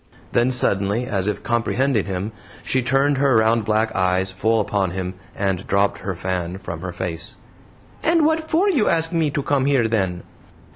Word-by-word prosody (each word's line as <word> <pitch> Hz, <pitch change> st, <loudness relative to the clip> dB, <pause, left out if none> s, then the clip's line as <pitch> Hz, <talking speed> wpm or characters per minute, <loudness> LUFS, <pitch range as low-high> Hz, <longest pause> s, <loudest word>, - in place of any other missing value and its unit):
Then 120 Hz, +2 st, +3 dB
suddenly, 105 Hz, -2 st, +1 dB
as 100 Hz, -6 st, -1 dB
if 105 Hz, -1 st, -2 dB
comprehending 120 Hz, 0 st, +1 dB
him, 95 Hz, +2 st, -3 dB, 0.3 s
she 130 Hz, -, +1 dB
turned 135 Hz, +2 st, +2 dB
her 140 Hz, -3 st, +3 dB
round 110 Hz, 0 st, +3 dB
black 110 Hz, +1 st, +1 dB
eyes 95 Hz, 0 st, +1 dB
full 110 Hz, +4 st, +1 dB
upon 100 Hz, -2 st, 0 dB
him 90 Hz, +1 st, -4 dB, 0.2 s
and 95 Hz, -2 st, -2 dB
dropped 100 Hz, 0 st, +1 dB
her 95 Hz, -2 st, -4 dB
fan 90 Hz, 0 st, -3 dB
from 85 Hz, -4 st, -7 dB
her 90 Hz, 0 st, -4 dB
face. 85 Hz, -2 st, -5 dB, 0.7 s
"And 330 Hz, -1 st, +3 dB
WHAT 315 Hz, 0 st, +1 dB
for 350 Hz, +6 st, +3 dB
you 290 Hz, -, +2 dB
ask 165 Hz, 0 st, +1 dB
me 165 Hz, -3 st, +1 dB
to 145 Hz, 0 st, -2 dB
come 140 Hz, -2 st, +1 dB
here 135 Hz, -5 st, +3 dB
then?" 95 Hz, -6 st, -1 dB
110 Hz, 180 wpm, -21 LUFS, 95-135 Hz, 0.7 s, Then